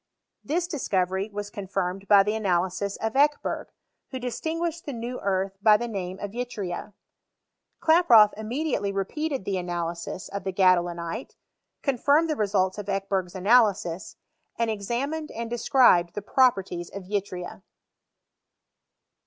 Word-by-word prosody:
This 340 +5 0
discovery 195 - -1
was 205 0 -5
con 200 -2 -7
firmed 195 +1 -2
by 200 -2 +7
the 210 +1 -1
analysis 190 -1 0
of 220 0 -2
Ekeherg, 290 +2 +1 0.4
who 260 - -5
distinguished 320 +7 -3
the 285 - -3
new 240 +2 -5
earth 195 0 -1
by 210 0 +6
tlie 235 +1 -4
name 185 -2 -4
of 205 0 -6
yttria. 210 -6 -5 0.9
Klaproth 250 -11 +6
im 215 +1 -7
mediately 250 -5 -1
repeated 265 +6 -3
the 195 -2 -1
analysis 175 0 -4
of 200 0 -6
the 190 - -2
g'adoliniter 175 +2 +1 0.5
confinned 285 +4 +2
the - - 0
results 195 -3 0
of 205 - -6
Ekebei^'s 195 -2 -2
analyais, 200 -3 +2 0.4
and 230 -1 +1
examined 255 +10 -3
and 230 0 -6
described 240 -8 +4
the 205 - -4
properties 195 -9 +1
of 200 - -8
yllria. 185 -2 -4
205 Hz, 135 wpm, -26 LUFS, 190-245 Hz, 0.9 s, by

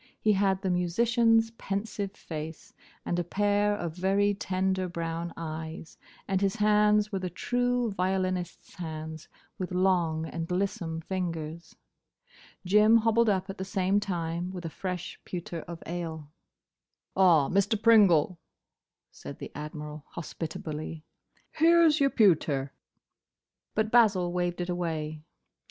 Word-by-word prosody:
He 215 - +3
had 195 0 +1
the 190 - +1
musician's 225 +6 +3
pensive 200 -2 -4
face, 160 -3 -8 0.3
and 175 - -1
a - - 0
pair 205 +3 +1
of 170 -5 -4
very 195 +3 +2
tender 190 -1 -1
brown 170 0 -4
eyes, 160 0 -6 0.3
and 190 -1 0
his 195 +1 +1
hands 210 0 +3
were 195 - -1
the 185 -1 -3
true 245 +4 0
violinist's 185 -1 -2
hands, 160 -2 -7 0.3
with 185 -1 -4
long 180 -4 +1
and 165 0 -5
lissome 180 -3 -2
fingers. 170 -2 -4 0.9
Jim 210 +4 +6
hobbled 230 0 +3
up 190 -1 0
at 195 0 -7
the - - -2
same 190 0 +1
time 175 -2 -3
with 180 -2 -7
a 165 - -4
fresh 180 0 -5
pewter 175 -1 -5
of 170 0 -8
ale. 160 -3 -5 0.8
"Ah, 170 -7 +5
Mr. 200 +3 +2
Pringle," 195 -7 +5 0.7
said - - -9
the - - -8
Admiral, 150 0 -7
hospitably, 160 -1 -6 0.6
"here 335 +1 +6
's 305 0 +3
your 275 -1 +4
pewter." 155 - +2 1.0
But 220 0 +1
Basil 195 -7 +4
waved 175 0 -1
it 175 - -3
away. 160 -3 -3
185 Hz, 130 wpm, -28 LUFS, 165-205 Hz, 1.0 s, Jim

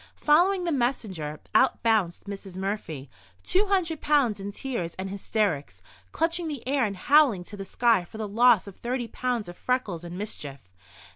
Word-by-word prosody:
Following 360 +5 +3
the 345 - 0
messenger, 210 - -2
out 260 - +3
bounced 215 -7 +1
Mrs. 195 -2 -7
Murphy—two 150 - -3
hundred 345 -6 0
pounds 275 -9 +2
in 200 +1 -5
tears 200 -8 -4
and 190 0 -5
hysterics, 200 -6 -2 0.3
clutching 335 +1 0
the 285 -6 -6
air 270 -2 +2
and 200 -2 -4
howling 275 -6 +4
to 205 - -9
the 195 - -6
sky 230 -1 +2
for 175 - -12
the 215 -1 -3
loss 230 0 +5
of 200 -3 -10
thirty 240 0 -3
pounds 240 -2 -2
of 175 - -8
freckles 210 -10 -2
and 175 +1 -7
mischief. 150 -9 -6
215 Hz, 165 wpm, -26 LUFS, 185-265 Hz, 0.3 s, loss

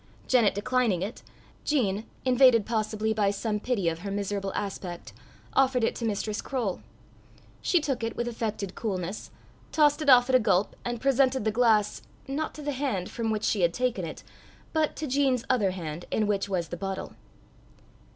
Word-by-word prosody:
Janet 235 -7 +4
declining 220 -4 +1
it, 210 +5 -6 0.4
Jean, 220 -8 0 0.2
invaded 250 -4 +5
possibly 220 -1 -1
by 210 -2 +2
some 210 +1 -2
pity 210 -6 -1
of 165 0 0
her 200 +3 -5
miserable 200 0 -2
aspect, 180 - -5 0.4
offered 260 -2 +3
it - - +2
to 235 - -3
Mistress 215 0 -2
Croale. 240 -9 -2 0.8
She 355 - +3
took 275 -6 -2
it 225 - -2
with 240 - -2
affected 215 -5 -3
coolness, 190 -2 -4 0.4
tossed 295 0 +3
it 300 - +1
off 245 -1 +7
at 260 - -1
a - - +7
gulp, 200 -3 +1
and 240 -1 -3
presented 265 -2 +2
the 220 - +2
glass 220 -2 +2 0.3
not 290 +3 -3
to 300 - -8
the 290 - -1
hand 255 -10 -2
from 230 -1 -2
which 215 -1 -1
she 205 - +1
had 170 -1 +2
taken 250 -7 0
it, 160 - -7 0.5
but 315 -1 +1
to 310 - -4
Jean's 265 -3 +1
other 220 -7 +2
hand, 170 -3 -5
in 215 - +1
which 200 -1 0
was 175 -4 -1
the 175 - -5
bottle. 195 +1 -4
220 Hz, 180 wpm, -27 LUFS, 195-255 Hz, 0.8 s, off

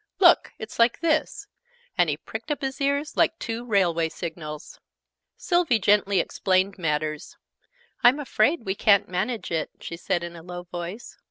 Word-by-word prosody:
"Look! 350 -3 +5
It's 220 +2 -9
like 230 +1 +3
this!" 315 -2 0 0.5
And - - +3
he - - -1
pricked - - -8
up 295 - -2
his 270 +1 -3
ears 280 +2 0
like 325 - +2
two 230 -4 -4
railway 175 -8 +1
signals. 155 -2 -7 0.6
Sylvie 345 -9 +2
gently 200 -1 +3
explained 185 +1 0
matters. 155 -1 -2 0.7
"I'm 250 +4 +6
afraid 275 +1 +1
we 190 - 0
ca'n't 200 0 +4
manage 210 +5 -2
it," 160 -2 -1
she 170 - -7
said 175 0 -1
in 170 0 -7
a 165 - -10
low 175 +1 -8
voice. 175 +5 -7
200 Hz, 160 wpm, -25 LUFS, 170-255 Hz, 0.7 s, I'm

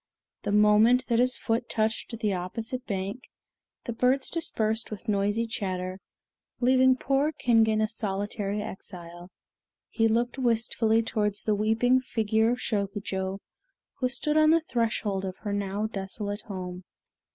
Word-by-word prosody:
The - - -2
moment 210 +5 +5
that 235 -1 +3
his 255 +1 +3
foot 230 +1 -1
touched 220 +1 -1
the 215 -2 0
opposite 225 +8 -4
bank, 200 +4 -4 0.5
the 235 - -4
birds 255 +3 +1
dispersed 225 -9 -1
with 215 +2 -8
noisy 205 +2 +1
chatter, 185 -4 -4 0.6
leaving 260 +1 +4
poor 275 +4 +1
Kingen 225 -6 +3
a 215 - +2
solitary 205 -1 -2
exile. 175 -4 -8 0.6
He 225 -1 +2
looked 240 +3 0
wistfully 225 -2 +2
towards 210 -2 -1
the 215 - +1
weeping 225 +5 +3
figure 220 -2 +1
of 245 - 0
Shokujo, 200 -3 -3 0.6
who 255 -2 +1
stood 300 +4 0
on 310 0 +6
the 330 +1 +5
threshold 220 -8 -1
of 185 -1 -5
her 205 -2 -3
now 200 +1 -1
desolate 205 0 -4
home. 180 -2 -6
220 Hz, 140 wpm, -27 LUFS, 200-240 Hz, 0.6 s, on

